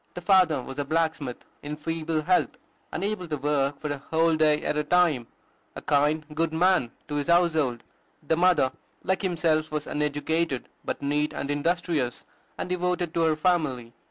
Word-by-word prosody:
The 180 - -5
father 180 -7 +4
was 135 +3 -7
a - - +1
blacksmith, 155 -4 -2 0.2
in 150 +1 -5
feeble 160 0 -2
health, 180 +3 +1 0.3
unable 195 +1 -2
to 150 -2 -2
work 140 0 0
for 150 - -3
a 145 - -3
whole 160 +3 +1
day 155 -1 +3
at - - 0
a 150 - 0
time, 155 -7 +2 0.5
a - - -6
kind, 150 +2 +2
good 165 +1 0
man 175 -5 +3 0.2
to 145 - -3
his 145 - -2
household; 160 -8 +2 0.4
the 160 - +3
mother, 175 -6 +3 0.3
like 190 - 0
himself, 160 -4 +1
was 150 -1 -2
uneducated, 150 0 -1
but - - -4
neat 150 +1 0
and 140 - -3
industrious, 155 -4 -1 0.3
and - - -3
devoted 180 -2 -1
to 165 - +1
her 160 -1 +3
family. 155 -8 0
155 Hz, 170 wpm, -26 LUFS, 145-170 Hz, 0.5 s, father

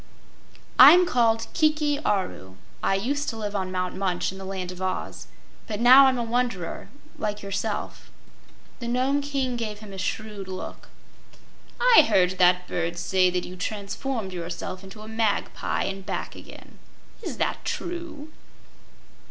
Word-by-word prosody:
"I'm 360 +1 +10
called 230 -7 +2
Kiki 305 -2 +2
Aru. 180 - -2 0.3
I 195 - +2
used 280 +9 -1
to 225 - -5
live 210 -1 -4
on 190 -2 -2
Mount 185 -1 -2
Munch 185 -2 -1
in 190 - -10
the 190 - -7
Land 190 -2 -4
of 180 0 -10
Oz, 185 0 -4 0.4
but 210 -4 -4
now 260 +3 +8
I'm 260 -1 +2
a 240 - -1
wanderer 230 -7 -2 0.3
like 210 -1 -3
yourself." 200 +2 -4 0.7
The 235 - -5
Nome 260 +4 +1
King 270 -3 -2
gave 215 -3 -4
him 210 -2 -11
a 190 - -7
shrewd 205 +1 -4
look. 185 -1 -8 0.9
"I - - +8
heard 185 0 +3
that 180 0 +4
bird 170 0 -2
say 185 0 +2
that 180 0 -2
you 180 - -8
transformed 200 +2 -4
yourself 175 +2 -5
into 195 +3 -11
a 215 - -10
magpie 220 -2 -1
and 195 0 -4
back 195 - -4
again. - - -13 0.4
Is - - -5
that - - -1
true?" 335 -4 -5
205 Hz, 150 wpm, -25 LUFS, 185-250 Hz, 0.9 s, I'm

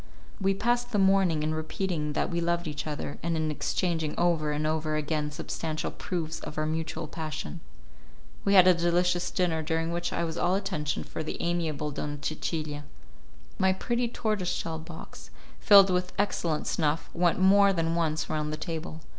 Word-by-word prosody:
We 195 0 +2
passed 240 +3 0
the - - +2
morning 190 -5 +3
in 155 +1 0
repeating 155 -1 -2
that - - -1
we 170 0 0
loved 170 0 0
each 150 0 -4
other, 150 -1 -4
and 165 -1 -1
in 155 -1 0
exchanging 160 0 -1
over 165 -3 +2
and 150 +1 -1
over 155 0 0
again 150 0 -1
substantial 155 +1 -4
proofs 165 -3 -4
of 150 - -8
our 155 - +1
mutual 160 +1 -2
passion. 155 - -5 0.8
We 200 0 +3
had 185 -1 +8
a 185 - +8
delicious 175 +1 +1
dinner, 170 -3 0
during 165 +1 -1
which 175 0 -2
I - - -1
was 165 0 -3
all 180 +2 +2
attention 150 -7 -2
for - - -6
the 155 - -5
amiable 160 -4 -1
Donna 145 0 -4
Cecilia. 155 -1 -3 0.8
My 190 0 +4
pretty 240 +5 -1
tortoise 215 -6 -1
shell 160 -1 -3
box, 160 0 -10 0.3
filled 200 -2 +8
with 180 0 0
excellent 170 -6 0
snuff, 155 0 0
went 175 -1 +2
more 200 +1 +6
than 165 -3 0
once 160 -2 0
round 150 -1 -2
the 155 - -3
table. 160 -1 -5
165 Hz, 175 wpm, -28 LUFS, 155-180 Hz, 0.8 s, had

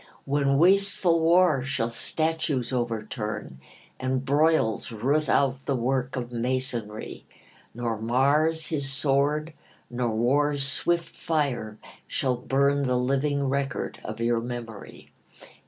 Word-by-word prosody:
When 140 -1 +1
wasteful 185 0 +3
war 165 -4 +4
shall 130 -3 -2
statues 155 -1 -1
overturn, 110 - -3 0.4
And 130 0 -1
broils 145 -7 +2
root 140 +7 0
out 135 -1 +1
the 140 - +1
work 130 +2 -1
of 125 -1 -4
masonry, 120 -3 -3 0.5
Nor 115 -2 -3
Mars 145 +7 +2
his 140 -4 -2
sword 145 +3 +1 0.4
nor 120 -1 -1
war's 140 +5 +2
quick 175 0 +2
fire 135 -11 -2 0.3
shall 130 -2 0
burn 140 +2 +1
The 125 0 +1
living 140 +3 0
record 140 0 -2
of - - -6
your 115 0 +1
memory. 115 -3 -8
135 Hz, 115 wpm, -26 LUFS, 120-145 Hz, 0.5 s, war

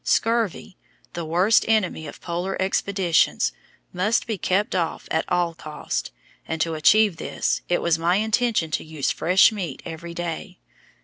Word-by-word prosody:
Scurvy, 225 -5 0 0.4
the 170 -1 -4
worst 180 +7 +3
enemy 200 -8 +1
of - - -11
Polar 175 +2 -3
expeditions, 190 -2 +1 0.4
must 205 +6 +1
be 225 - -2
kept 190 +3 0
off 170 -3 -2
at 160 - +1
all 175 -1 +1
costs, 155 -2 -5 0.4
and 165 - -3
to 165 0 0
achieve 200 +4 +4
this 120 -6 -2
it 175 - +1
was 165 -1 +2
my 170 +2 +2
intention 220 -5 +1
to - - -1
use 155 -3 -2
fresh 185 +6 +4
meat 195 -6 -5
every 170 +1 -7
day. 175 -2 -5
175 Hz, 150 wpm, -23 LUFS, 165-205 Hz, 0.4 s, achieve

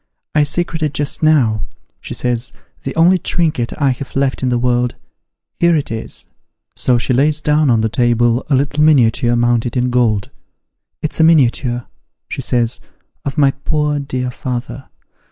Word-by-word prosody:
I 155 - +3
secreted 155 0 -1
just 145 -1 -2
now,' 130 - +3 0.4
she - - -7
says, 120 -1 -1
' - - -39
the 135 - -4
only 175 +3 +4
trinket 155 -8 0
I 140 -3 +3
have 130 +2 -7
left 135 -1 0
in 130 - 0
the 120 - +1
world 120 0 0 0.6
here 170 -1 +4
it 145 -6 -2
is.' 110 0 -6 0.5
So 125 -1 +2
she 120 +2 -1
lays 145 +4 +2
down 150 -1 +2
on 115 -2 +3
the 110 - +1
table 120 +1 +1
a 140 - +3
little 145 +3 +1
miniature 120 -5 +3
mounted 120 +1 +1
in 125 0 +1
gold. 115 -5 +1 0.3
' - - -59
It's 155 - -2
a - - +5
miniature,' 125 -6 +2 0.4
she - - -5
says, 120 -2 0 0.2
' - - -47
of 140 +1 -4
my 140 -2 +4
poor 150 +1 -1
dear 130 -2 -3
father 125 +2 -6
130 Hz, 170 wpm, -17 LUFS, 120-150 Hz, 0.6 s, a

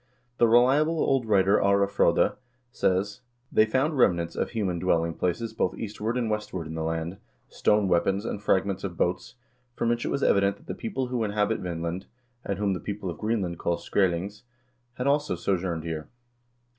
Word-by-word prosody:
The 120 - +6
reliable 135 +8 +4
old 135 -6 +1
writer 100 -1 +4
Are 100 0 +4
Frode3 100 0 +2 0.4
says: 100 +3 0 0.3
"They 110 - +4
found 135 +5 0
remnants 85 -7 +2
of - - -1
human 95 -7 -2
dwelling 85 -2 +1
places 90 +7 -2
both 95 - -1
eastward 110 +2 -3
and 120 -2 0
westward 105 -5 -3
in 80 - -7
the 80 - -3
land, 80 +3 -3 0.3
stone 105 -1 +2
weapons 95 +4 +1
and 105 - -4
fragments 95 -1 +1
of 90 -4 -5
boats, 120 +8 -1 0.4
from 115 - 0
which 120 0 0
it - - -2
was 140 - -1
evident 100 0 +3
that - - -21
the - - -4
same - - -13
people 195 - -2
who 125 -2 -1
inhabit 105 +1 0
Vinland, 85 0 -4 0.4
and 100 - -3
whom 100 -1 0
the 90 - -3
people 100 -2 -4
of 80 - -10
Greenland 100 -6 -1
call 85 0 0
Skrselings,4 95 +2 -1 0.5
had 125 - -3
also 145 +2 +2
sojourned 90 -4 -1
here." 80 -2 -5
100 Hz, 180 wpm, -27 LUFS, 90-115 Hz, 0.5 s, The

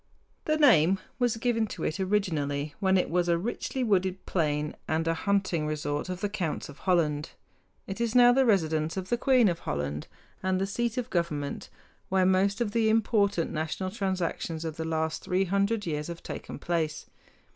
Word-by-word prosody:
The 310 0 +2
name 195 - +5 0.2
was 245 -3 +1
given 230 -1 +1
to 180 - -6
it 165 - -2
originally 155 -7 -1
when 190 -1 +3
it 180 - +1
was 175 +1 +1
a 170 - +3
richly 240 +6 -3
wooded 190 -4 +1
plain 150 -3 -1
and 160 +1 0
a 165 - +3
hunting 185 -3 0
resort 150 +1 -2
of 180 0 -4
the 205 - +1
counts 185 -9 -3
of 145 - -12
Holland. 160 -5 +1 0.5
It 195 +4 -5
is 235 0 -1
now 245 0 +8
the 265 +1 +4
residence 160 -7 +1
of 185 -1 -4
the 240 - +3
queen 255 -4 +4
of 170 -2 0
Holland 75 0 -3 0.3
and 185 0 0
the 195 - +1
seat 235 +4 -2
of 250 -1 -3
government, 150 -5 -2 0.4
where 190 0 +3
most 195 +3 +2
of 220 -3 0
the 225 0 +2
important 205 -5 +2
national 160 +4 -3
transactions 180 -5 -2
of 160 -2 -4
the 160 - -3
last 160 0 -1
three 185 +1 +1
hundred 200 +3 0
years 150 -2 -2
have 170 -1 -7
taken - - -7
place. 160 -3 -2
185 Hz, 185 wpm, -28 LUFS, 160-205 Hz, 0.5 s, now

